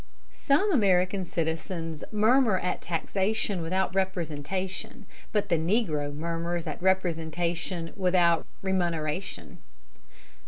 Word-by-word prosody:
Some 310 +9 +2
American 190 - +3
citizens 165 -1 -3
murmur 220 0 +4
at 180 - -2
taxation 195 +3 -1
without 185 +3 0
representation, 190 - -2 0.3
but 210 -2 0
the 170 - +3
negro 160 -5 0
murmurs 170 +2 -3
at - - -5
representation 170 -1 0
without 180 -3 +3 0.2
remuneration. 175 -2 -2
180 Hz, 90 wpm, -28 LUFS, 165-195 Hz, 0.3 s, murmur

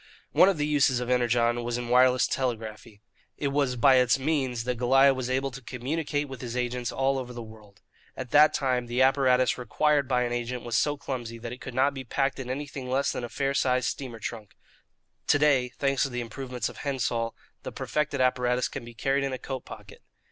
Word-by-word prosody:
One 190 - +6
of 195 - 0
the 150 - 0
uses 145 -4 +2
of 125 0 -3
Energon 120 -1 +2
was 120 0 -2
in 120 -1 -4
wireless 125 +1 +4
telegraphy. 110 -4 -4 0.3
It 140 - -1
was 140 -2 0
by 130 +2 +5
its 125 0 +4
means 130 -4 -1
that 125 -1 -3
Goliah 135 +2 +5
was 130 -1 -4
able 135 +1 0
to 135 +2 -9
communicate 145 +4 -3
with 135 -3 -9
his 120 -1 -5
agents 125 -1 -2
all 135 0 0
over 125 -1 -7
the 120 -1 -7
world. 105 -2 -15 0.4
At 130 -2 -6
that 150 +1 +7
time 125 -3 0
the 125 +2 +2
apparatus 130 -2 +3
required 145 +3 +1
by 125 -2 +2
an 120 0 -2
agent 120 +1 -3
was 120 -1 -3
so 145 -1 +1
clumsy 120 -5 -5
that 115 +1 -7
it 125 - -11
could 135 - -8
not 135 +2 +3
be 135 -1 -6
packed 135 +2 -1
in 130 -2 -6
anything 135 -1 -5
less 135 +2 +1
than - - -4
a 120 - -5
fair 135 +2 -1
sized 130 -2 +1
steamer 125 -4 -6
trunk. 110 -2 -7 0.7
To - - +5
day, 140 -4 +3
thanks 135 +1 -1
to 135 - +2
the 125 -1 -3
improvements 125 0 -4
of - - -10
Hendsoll, 120 -4 -2 0.3
the - - -6
perfected 150 -2 -2
apparatus 125 -1 +1
can 135 - -6
be 120 0 -11
carried 135 +4 0
in 135 -1 -2
a - - -2
coat 130 0 -6
pocket. - - -12
130 Hz, 215 wpm, -27 LUFS, 120-135 Hz, 0.7 s, that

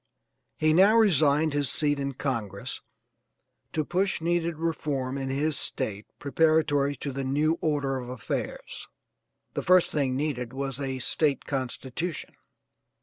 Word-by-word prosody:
He 155 0 +3
now 195 +6 +6
resigned 155 -7 +4
his 145 -3 +1
seat 145 0 +1
in 140 0 -2
Congress 110 -8 -3 0.9
to 155 -2 -1
push 190 +4 0
needed 170 0 0
reform 145 -5 -2
in 135 -1 -3
his 145 +3 +1
State 105 -5 -1
preparatory 145 -1 +2
to 140 +2 -5
the 135 +1 -4
new 150 +5 +1
order 140 -3 0
of 125 -1 -7
affairs. 125 -3 -5 0.7
The - - -2
first 185 -1 +4
thing 135 -4 0
needed 130 -4 -2
was 135 0 -3
a 135 -1 -2
State 140 +3 +1
constitution. 135 +4 -4
145 Hz, 135 wpm, -27 LUFS, 135-160 Hz, 0.9 s, now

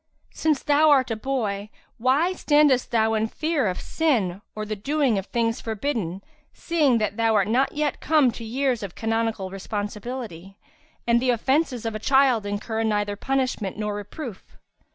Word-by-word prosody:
Since 310 -3 0
thou 295 +2 +4
art 265 -4 +4
a - - 0
boy, 215 -4 -2 0.3
why 275 +10 +2
standest 295 -6 +3
thou 225 -1 +2
in 220 0 +1
fear 305 -1 -1
of 180 - -2
sin 215 - 0
or 215 0 -4
the 215 0 -3
doing 270 0 +1
of 195 - -8
things 230 -1 -1
forbidden, 220 - -3 0.3
seeing 300 -8 +2
that 215 -1 -1
thou 225 -1 +2
art 200 -2 +3
not 255 +5 +1
yet 300 -1 -1
come 300 -5 +4
to 230 - -9
years 250 +1 -1
of 200 -4 -7
canonical 225 -4 -1
responsibility; 205 -1 -6 0.5
and 235 0 +3
the 255 - +1
offences 250 +1 +1
of 225 - -2
a 215 - -4
child 260 -4 +3
incur 215 +2 -3
neither 205 -2 0
punishment 255 -5 -2
nor 210 -1 -2
reproof? 205 +2 -8
230 Hz, 165 wpm, -24 LUFS, 210-270 Hz, 0.5 s, thou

